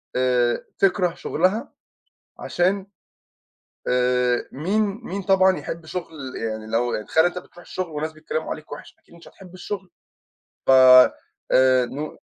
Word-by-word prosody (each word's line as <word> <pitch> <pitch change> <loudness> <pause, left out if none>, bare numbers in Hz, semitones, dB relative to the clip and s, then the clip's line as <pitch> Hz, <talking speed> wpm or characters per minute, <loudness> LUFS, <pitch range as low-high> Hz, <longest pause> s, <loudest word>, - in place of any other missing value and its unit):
آآ، 125 -1 +1
تكره 185 -3 +2
شغلها 190 - -1 0.7
عشان، 190 +3 -1 1.0
آآ، 125 0 +1
مين 190 +10 0 0.2
مين 195 +2 -5
طبعًا 190 0 +3
يحب 165 -1 -7
شغل 155 -7 -7
يعني 110 -1 -4
لو 120 +2 -1
يعني 105 - -4
تخيل 160 +1 +3
أنت 175 +1 0
بتروح 175 - -16
الشغل 180 0 -6
وناس 155 +1 -4
بيتكلّموا 155 0 -5
عليك 155 -1 -7
وِحِش، 145 - -10
أكيد - - -23
مش 170 - -15
هتحب 185 -1 -16
الشغل. 190 0 -7 0.8
ف - - +3
آآ، 130 0 +5
نو 145 +5 -7
155 Hz, 135 wpm, -22 LUFS, 125-185 Hz, 1.0 s, آآ